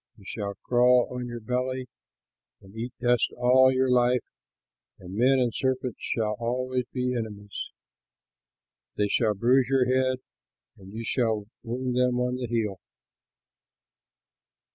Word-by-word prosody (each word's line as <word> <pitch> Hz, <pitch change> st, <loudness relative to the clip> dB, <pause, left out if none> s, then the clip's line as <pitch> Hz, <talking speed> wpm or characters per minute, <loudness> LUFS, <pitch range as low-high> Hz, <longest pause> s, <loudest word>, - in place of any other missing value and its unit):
You 100 Hz, -, -17 dB
shall 100 Hz, -1 st, -4 dB
crawl 125 Hz, 0 st, +4 dB
on 125 Hz, -1 st, -4 dB
your 120 Hz, 0 st, -6 dB
belly 125 Hz, +3 st, -2 dB, 0.7 s
and 95 Hz, +2 st, -17 dB
eat 120 Hz, +2 st, -4 dB
dust 120 Hz, -1 st, +2 dB
all 130 Hz, +2 st, +5 dB
your 130 Hz, 0 st, +2 dB
life, 125 Hz, 0 st, +3 dB, 0.7 s
and 90 Hz, 0 st, -10 dB
men 125 Hz, +6 st, +4 dB
and 125 Hz, -3 st, +1 dB
serpents 130 Hz, -1 st, -1 dB
shall 110 Hz, -2 st, -1 dB
always 125 Hz, +1 st, -1 dB
be 125 Hz, -1 st, -1 dB
enemies. 105 Hz, -3 st, -5 dB, 1.3 s
They 105 Hz, -1 st, +1 dB
shall 110 Hz, -1 st, +2 dB
bruise 125 Hz, +4 st, +3 dB
your 135 Hz, -2 st, +3 dB
head, 130 Hz, 0 st, +2 dB, 0.6 s
and 95 Hz, 0 st, -14 dB
you 115 Hz, +2 st, -6 dB
shall 110 Hz, -4 st, 0 dB, 0.2 s
wound 125 Hz, +1 st, -3 dB
them 125 Hz, -1 st, +2 dB
on 125 Hz, 0 st, 0 dB
the 125 Hz, -1 st, -4 dB
heel." 110 Hz, -5 st, -1 dB
125 Hz, 135 wpm, -27 LUFS, 110-125 Hz, 1.3 s, all